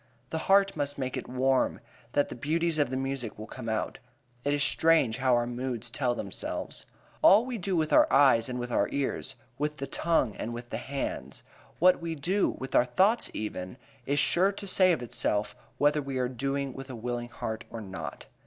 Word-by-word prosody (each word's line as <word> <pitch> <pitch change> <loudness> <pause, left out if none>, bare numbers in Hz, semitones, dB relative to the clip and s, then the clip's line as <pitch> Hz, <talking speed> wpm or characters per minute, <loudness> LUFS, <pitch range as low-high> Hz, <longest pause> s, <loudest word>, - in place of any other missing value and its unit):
The 160 - -1
heart 195 0 +5
must 145 -1 -2
make 130 -2 -3
it - - -5
warm, 130 +1 +1 0.3
then 145 - +3
the - - -7
beauties 160 +5 0
of 145 - +2
the 130 - -2
music 135 -4 -3
will 110 - -7
come 115 0 -7
out. 110 -1 -2 0.4
It 145 - +1
is 145 0 +2
strange 160 -8 +3
how 130 -2 +3
our 120 0 +2
moods 120 -1 -3
tell 125 -3 0
themselves. 100 -5 -4 0.3
All 215 +4 +7
we 250 -3 -4
do 190 0 -1
with 155 -2 +1
our - - +6
eyes 130 -4 +5
and 125 - -3
with 120 0 -4
our 100 - +2
ears, 140 -1 -2 0.2
with 150 +1 -1
the 135 - -3
tongue 135 -5 +1
and 120 +1 -4
with 120 0 -9
the - - -2
hands, 135 +3 -5 0.3
what 180 +1 +5
we 165 -1 -3
do 185 +7 +1
with 130 - -6
our 120 - +5
thoughts 195 - +2
even, 105 0 -5 0.3
is 140 +1 +1
sure 175 +7 +4
to 200 0 -8
say 185 -1 +5
of 135 -8 0
itself 105 -3 -1 0.2
whether 145 +1 +3
we 135 -1 -4
are 125 -1 +1
doing 135 +2 -2
with 135 0 -9
a 130 - -6
willing 120 +1 -4
heart 110 -2 -5
or 115 - -6
not. 95 -3 -7
135 Hz, 205 wpm, -29 LUFS, 120-155 Hz, 0.4 s, All